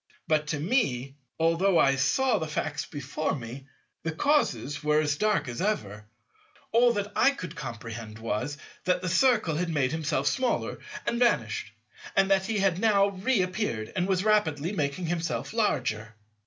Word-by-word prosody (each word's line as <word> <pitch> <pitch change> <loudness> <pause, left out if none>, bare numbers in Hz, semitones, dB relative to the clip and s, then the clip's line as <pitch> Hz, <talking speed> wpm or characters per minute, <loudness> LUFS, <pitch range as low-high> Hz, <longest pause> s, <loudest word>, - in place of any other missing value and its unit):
But 155 -1 +1
to 150 -1 -2
me, 140 - 0 0.3
although 165 +3 +3
I 135 -3 +4
saw 225 - +2
the 160 - -3
facts 150 0 -3
before 145 +1 -3
me, 130 +1 -8 0.3
the 160 - -2
causes 145 - 0
were 150 0 +3
as 145 -2 +1
dark 210 -4 +1
as 120 +3 -4
ever. 105 - -2 0.6
All 240 +1 +5
that 205 -1 -3
I - - +5
could 180 - -6
comprehend 115 -5 -7
was, 115 +6 -3 0.3
that 180 0 +1
the 185 - -1
Circle 210 - +3
had 175 +1 -1
made 140 -5 +1
himself 160 -1 -1
smaller 255 -2 0 0.3
and 235 - -1
vanished, 240 -1 +1 0.4
and 195 0 +3
that 190 0 +3
he 225 - -1
had 195 -3 +2
now 200 -2 +4
re 200 +2 +1
appeared 180 - -3
and 185 0 0
was 190 -1 +1
rapidly 175 -7 +2
making 155 -2 -2
himself 165 +2 -2
larger. 115 - -1
165 Hz, 165 wpm, -27 LUFS, 140-205 Hz, 0.6 s, All